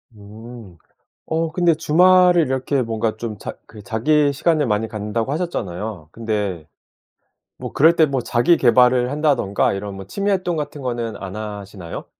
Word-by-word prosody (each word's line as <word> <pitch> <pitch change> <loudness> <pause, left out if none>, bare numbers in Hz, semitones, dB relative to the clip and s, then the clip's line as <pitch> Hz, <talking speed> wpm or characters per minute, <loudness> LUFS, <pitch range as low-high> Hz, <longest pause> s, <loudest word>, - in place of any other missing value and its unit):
음. 105 -1 -12 0.5
어 160 0 -1
근데 170 0 +3
주말을 180 +2 +4
이렇게 130 +1 -1
뭔가 110 -1 -2
좀 110 -3 -5
자 - - -7
그 105 -2 -13
자기 140 +7 +1
시간을 155 0 +1
많이 105 +1 0
갖는다고 110 +4 -3
하셨잖아요? 105 - -4
근데 105 -8 -3 0.9
뭐 - - -7
그럴 160 +4 +5
때 160 - +5
뭐 135 -3 -2
자기 125 +9 +2
계발을 125 0 +4
한다든가 145 -12 +1
이런 100 0 -5
뭐 95 -1 -9
취미 200 - -2
활동 185 -3 0
같은 145 -1 -5
거는 120 -3 -3
안 95 0 -8
하시나요? 100 -4 -7
120 Hz, 310 characters per minute, -20 LUFS, 105-150 Hz, 0.9 s, 그럴